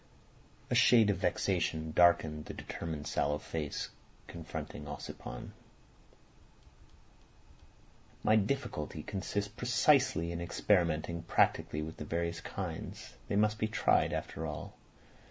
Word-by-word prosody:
A - - +3
shade 120 -3 +6
of 100 - -2
vexation 80 0 0
darkened 80 -3 +4
the - - -7
determined 80 -3 -5
sallow 75 +1 0
face 75 -2 -4 0.4
confronting 75 - -7
Ossipon. 75 - -7 2.7
"My 110 - +5
difficulty 105 - -1
consists 100 0 -3
precisely 125 - +3
in 85 0 -4
experimenting 85 -2 +1
practically 75 -2 +1
with 80 +1 -7
the 75 - -6
various 85 +1 -2
kinds. - - -6
They - - -1
must 105 +1 +2
be 110 - +1
tried 110 - +3
after 80 +1 -3
all. 75 - -6
85 Hz, 110 wpm, -33 LUFS, 80-105 Hz, 2.7 s, shade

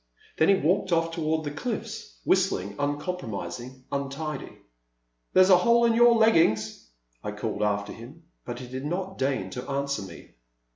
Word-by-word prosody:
Then 160 - +5
he 200 - +7
walked 185 +2 +1
oflF 165 -1 +1
toward 160 -1 -1
the 145 - -4
cliflFs, 155 - -5
whis - - +4
tling, 100 +3 -4
uncompromising, 130 - -4
untidy. 140 +1 -4 0.8
There 185 - +7
*s 190 - +3
a 185 - +9
hole 235 +5 +4
in 230 - +4
your 240 0 +6
leggings! 135 - +2 0.2
" - - -42
I - - -3
called - - -4
after 100 -1 0
him, 130 +9 -12 0.2
but 120 -1 -6
he 125 0 -8
did 130 +2 -6
not 185 +4 -3
deign 135 0 -1
to 125 +1 -6
answer 140 -2 -1
me. 95 - -11
145 Hz, 175 wpm, -27 LUFS, 120-180 Hz, 0.8 s, a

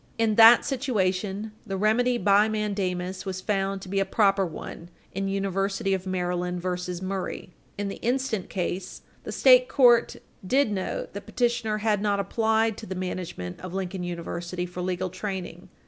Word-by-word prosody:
In 225 -1 +2
that 225 +2 +8
situation, 210 -5 -1
the 195 -4 -4
remedy 240 +5 +2
by 205 0 +4
mandamus 190 -4 -2
was 190 -2 -4
found 195 -1 -1
to - - -9
be 195 +1 0
a - - +3
proper 195 0 +2
one 170 0 -7 0.2
in 195 +1 -2
University 195 0 -1
of 190 0 -3
Maryland 180 -1 -2
v. 180 - -4 0.4
Murray, 190 0 -3
supra. - - -26 0.2
In 205 0 -2
the 195 - -5
instant 245 -5 -1
case, 185 0 -4 0.2
the - - -5
state - - +6
court 240 -4 +5 0.3
did 255 +4 +2
note 190 -2 -3
that 200 - -8
petitioner 235 -3 0
had 210 -1 +1
not 205 -1 +1
applied 220 +1 +1
to 220 - -9
the 190 - -4
management 180 - -5
of 185 +1 -7
Lincoln 190 -1 -3
University 175 0 -4
for 180 0 -7
legal 185 0 -2
training. 185 -2 -6
195 Hz, 165 wpm, -26 LUFS, 185-220 Hz, 0.4 s, that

